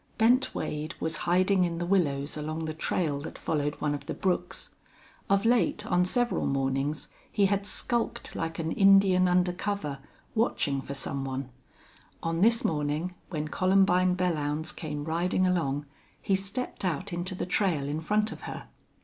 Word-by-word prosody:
Bent 245 Hz, +3 st, +3 dB
Wade 155 Hz, +2 st, -3 dB
was 160 Hz, 0 st, -2 dB
hiding 185 Hz, +1 st, +4 dB
in 170 Hz, -1 st, -1 dB
the 175 Hz, -, -2 dB
willows 150 Hz, -7 st, +1 dB
along 155 Hz, +1 st, -3 dB
the 155 Hz, -, -3 dB
trail 155 Hz, -2 st, -1 dB
that 145 Hz, -, -7 dB
followed 150 Hz, -1 st, -1 dB
one 150 Hz, -1 st, 0 dB
of 145 Hz, -, -6 dB
the -, -, -3 dB
brooks. 180 Hz, -1 st, -2 dB, 0.6 s
Of 200 Hz, +2 st, +3 dB
late, 230 Hz, -3 st, +2 dB
on 180 Hz, -3 st, +2 dB
several 240 Hz, +6 st, 0 dB
mornings, 135 Hz, +2 st, -1 dB, 0.2 s
he 200 Hz, -, +3 dB
had 200 Hz, +1 st, 0 dB
skulked 235 Hz, +2 st, -2 dB
like 165 Hz, 0 st, -3 dB
an 165 Hz, -1 st, -2 dB
Indian 195 Hz, -1 st, +5 dB
under 180 Hz, 0 st, +3 dB
cover, 180 Hz, -7 st, -3 dB, 0.3 s
watching 150 Hz, -, +1 dB
for 140 Hz, -, -6 dB
some 135 Hz, 0 st, -2 dB
one. 135 Hz, -1 st, -4 dB, 0.7 s
On 165 Hz, +1 st, -1 dB
this 230 Hz, +2 st, +4 dB
morning, 150 Hz, +3 st, -1 dB, 0.2 s
when 155 Hz, -3 st, -3 dB
Columbine 185 Hz, 0 st, +3 dB
Belllounds 160 Hz, -3 st, -1 dB
came 150 Hz, -3 st, -4 dB
riding 175 Hz, +3 st, +1 dB
along, 150 Hz, -6 st, 0 dB, 0.3 s
he 195 Hz, -, +1 dB
stepped 195 Hz, +7 st, -4 dB
out 185 Hz, +2 st, -2 dB
into 175 Hz, +2 st, -2 dB
the -, -, -3 dB
trail 180 Hz, -6 st, +1 dB
in 150 Hz, +2 st, -2 dB
front 210 Hz, +5 st, +1 dB
of -, -, -8 dB
her. -, -, -8 dB
175 Hz, 165 wpm, -28 LUFS, 150-195 Hz, 0.7 s, Indian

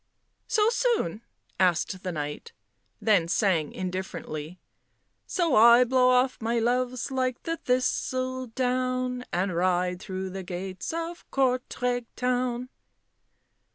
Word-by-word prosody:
" -, -, -49 dB
So 425 Hz, -1 st, +3 dB
soon?" 465 Hz, -, 0 dB, 0.4 s
asked 185 Hz, 0 st, +1 dB
the 185 Hz, -, -3 dB
Knight, 150 Hz, -2 st, -5 dB, 0.5 s
then 200 Hz, -7 st, +3 dB
sang 170 Hz, -5 st, +1 dB
indifferently 180 Hz, -3 st, -5 dB, 0.2 s
— -, -, -47 dB
" -, -, -48 dB
So 340 Hz, -5 st, +2 dB
I 235 Hz, +3 st, +8 dB
blow 255 Hz, 0 st, +3 dB
off 255 Hz, 0 st, +2 dB
my 230 Hz, +1 st, 0 dB
loves 250 Hz, +2 st, 0 dB
like 255 Hz, -2 st, -1 dB
the 330 Hz, 0 st, -2 dB
thistledown, 255 Hz, 0 st, -1 dB
And 180 Hz, 0 st, 0 dB
ride 180 Hz, 0 st, +1 dB
through 190 Hz, -1 st, -5 dB
the 190 Hz, +1 st, -5 dB
gates 185 Hz, 0 st, -5 dB
of 335 Hz, +1 st, -5 dB
Courtrai 250 Hz, -2 st, 0 dB
town." 250 Hz, 0 st, -1 dB
245 Hz, 120 wpm, -27 LUFS, 185-255 Hz, 0.5 s, I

